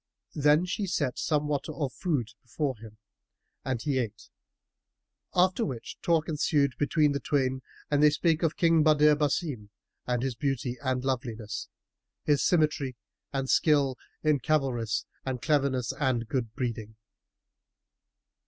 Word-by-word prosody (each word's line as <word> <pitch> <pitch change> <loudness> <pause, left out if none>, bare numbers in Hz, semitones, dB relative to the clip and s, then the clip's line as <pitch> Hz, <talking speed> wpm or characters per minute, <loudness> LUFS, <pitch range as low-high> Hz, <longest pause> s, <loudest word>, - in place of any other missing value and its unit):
Then 150 +3 +4
she 195 +2 -2
set 140 -7 -1
somewhat 150 -1 0
of 145 -4 -3
food 145 - -1
before 135 +2 -2
him 110 -1 -12 0.7
and 130 -3 -2
he 135 +1 0
ate, 110 -3 -5 1.1
after 185 +5 +3
which 125 - -6
talk 165 -2 +2
ensued 145 -3 +1
between 150 0 +3
the 140 - -1
twain 130 -1 0 0.3
and 145 0 +3
they 150 - +7
spake 160 +2 +1
of 165 -2 +1
King 165 -2 +4
Badr 150 -1 +5
Basim 145 -6 -1 0.4
and 125 -1 0
his 135 -1 -1
beauty 130 -1 -2
and 130 -1 -1
loveliness, 115 -4 -3 0.6
his 145 -4 +2
symmetry 150 -6 +1 0.4
and 135 -1 -2
skill 140 -3 +3 0.3
in 150 -2 +3
cavalarice 130 -6 0 0.2
and 130 -2 -3
cleverness 135 0 +1
and 130 -5 0
good 120 -3 -2
breeding. 115 -3 -4
140 Hz, 135 wpm, -28 LUFS, 125-150 Hz, 1.1 s, they